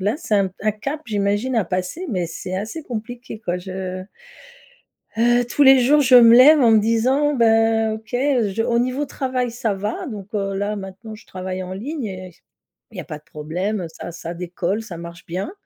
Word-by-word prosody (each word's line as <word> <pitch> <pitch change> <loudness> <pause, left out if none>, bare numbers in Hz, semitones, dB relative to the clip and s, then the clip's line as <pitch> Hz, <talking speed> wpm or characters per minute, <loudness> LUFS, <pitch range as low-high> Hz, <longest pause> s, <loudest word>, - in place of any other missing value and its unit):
là 205 +7 0
c'est 220 -10 -2
un 195 -1 +3
p 185 - -23
un 215 +1 +1
cap 275 +9 -5
j'imagine 205 +4 0
à 220 - +2
passer, 185 - -3
mais 180 -5 -1
c'est 180 +3 -6
assez 220 +11 -5
compliqué 240 -2 -7
quoi, 175 -4 -2
je 185 0 -5 1.2
Heu, 240 +1 +3
tous 265 +4 +2
les 270 -1 +8
jours, 285 +4 +4
je 260 -2 +2
me 235 -1 +9
lève 290 +5 +8
en 240 - +5
me 220 - +6
disant: 255 +7 +2
«Bah 225 -2 +3
OK, 220 +2 -13
heu, 245 -4 +1
je» 220 +4 -1
au 235 - +1
niveau 255 +4 0
travail 255 -3 -2
ça 230 -2 -2
va, 205 +2 -4
donc 205 -6 -7
heu, 195 -1 -1
là 205 +2 -2
maintenant 200 +3 -8
je 220 - -16
travaille 185 0 -5
en 185 0 -6
ligne 265 +7 -5
et 185 -2 -7
c - - -28 0.5
il - - -12
y - - -3
a - - -9
pas 150 - -7
de - - -34
problème, 165 +6 -3
heu, 170 - -4
ça 160 +2 -9
ça 170 0 -7
décolle, 180 +4 -3
ça 185 -6 -8
marche 170 0 -10
bien. 185 - -4
215 Hz, 220 wpm, -21 LUFS, 185-245 Hz, 1.2 s, me